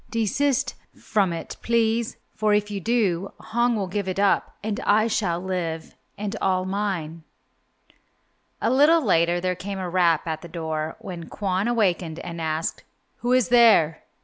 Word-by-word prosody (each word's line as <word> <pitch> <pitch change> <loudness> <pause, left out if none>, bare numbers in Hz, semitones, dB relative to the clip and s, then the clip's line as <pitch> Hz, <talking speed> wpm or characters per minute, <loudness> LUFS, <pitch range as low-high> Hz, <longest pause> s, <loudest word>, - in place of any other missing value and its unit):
Desist 270 +5 0 0.2
from 200 -5 0
it, 165 - -6
please, 230 0 +1 0.2
for 215 -1 +2
if 210 0 0
you 200 - -3
do, 195 -4 0
Hong 235 +2 0
will 205 -3 -1
give 190 +1 -3
it 185 - -3
up 200 -1 +2
and 210 -1 -2
I 215 +2 +3
shall 210 -7 0
live 175 -3 -4 0.2
and 205 0 -4
all 185 -1 +1
mine." 185 -5 -3 1.4
A - - +1
little 300 +5 +5
later 170 -2 +3
there 185 +1 0
came 195 +2 -6
a 185 -1 -3
rap 170 -3 +2
at 160 -2 -3
the 170 - -9
door, 160 -2 -4
when 180 -7 -8
Kwon 195 +1 -1
awakened 185 -8 0
and 170 -1 -6
asked, 160 0 -2 0.3
"Who 245 - -2
is 255 -1 +3
there?" 225 -10 +5
195 Hz, 160 wpm, -24 LUFS, 170-220 Hz, 1.4 s, little